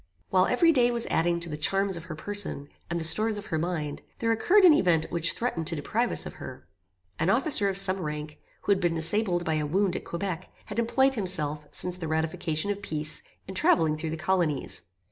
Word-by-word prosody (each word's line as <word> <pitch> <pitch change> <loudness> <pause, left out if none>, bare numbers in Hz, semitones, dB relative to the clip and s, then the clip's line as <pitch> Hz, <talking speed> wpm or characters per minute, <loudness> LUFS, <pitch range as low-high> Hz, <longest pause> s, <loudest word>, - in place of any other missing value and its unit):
While 185 -1 +3
every 330 +7 +4
day 245 -5 +3
was 235 -1 -2
adding 170 +1 +1
to 170 - 0
the 155 - -5
charms 195 +5 0
of 170 0 -8
her 165 -4 -7
person, 190 -5 -2 0.2
and 170 0 -2
the - - -3
stores 215 +6 +3
of 205 - -8
her 160 - -2
mind, 155 -4 -3 0.2
there 230 0 0
occurred 365 - +3
an 340 - +8
event 170 - +2
which 170 -1 +4
threatened 175 -10 -3
to 165 - +1
deprive 225 +11 -1
us - - +1
of - - -7
her. - - -9 0.5
An - - +1
officer 210 - +4
of 195 - -2
some 190 -1 +5
rank, 150 -1 -6 0.2
who - - 0
had 195 - +3
been 175 -2 +1
disabled 175 +1 +1
by 160 -1 0
a 150 - -2
wound 185 +3 0
at - - -4
Quebec, 185 0 -5 0.2
had 210 +1 -4
employed 265 +4 +2
himself, 155 - -2
since 180 0 -2
the 165 - -4
ratification 160 +3 -2
of 205 0 -5
peace, 155 -3 -2 0.3
in 190 - -7
travelling 160 -4 +2
through 155 +1 -4
the 160 - -4
colonies. 165 -5 -1
180 Hz, 220 wpm, -27 LUFS, 160-205 Hz, 0.5 s, an